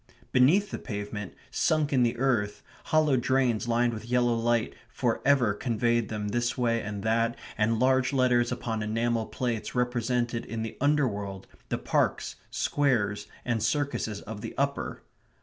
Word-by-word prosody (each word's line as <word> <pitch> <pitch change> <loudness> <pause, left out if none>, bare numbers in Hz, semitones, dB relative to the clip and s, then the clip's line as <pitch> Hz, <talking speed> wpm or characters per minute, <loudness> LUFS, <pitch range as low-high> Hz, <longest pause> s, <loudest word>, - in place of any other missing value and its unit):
Beneath 165 +11 +4
the - - -4
pavement, 105 -2 -5 0.2
sunk 155 -2 +1
in 130 - +4
the 120 0 +2
earth, 105 -6 0 0.2
hollow 155 -4 +3
drains 125 -2 +1
lined 120 0 +2
with 110 0 -6
yellow 120 -1 +3
light 115 0 +1 0.2
for - - -1
ever 130 -7 +4
conveyed 120 +1 0
them 105 -1 -3
this 120 +4 -1
way 115 -2 +1
and 105 -2 -5
that, 115 +1 +1 0.2
and 110 +1 +1
large 130 +1 +3
letters 125 -3 +3
upon 115 -3 -2
enamel 115 +1 0
plates 120 -3 -3
represented 120 -1 0
in 110 +1 -4
the 115 0 -5
underworld 105 -10 0 0.2
the - - 0
parks, - - 0
squares, 115 -8 0 0.2
and 120 -2 0
circuses 115 -3 -1
of 105 0 -7
the - - -6
upper. 140 +1 -2
120 Hz, 150 wpm, -28 LUFS, 110-130 Hz, 0.2 s, Beneath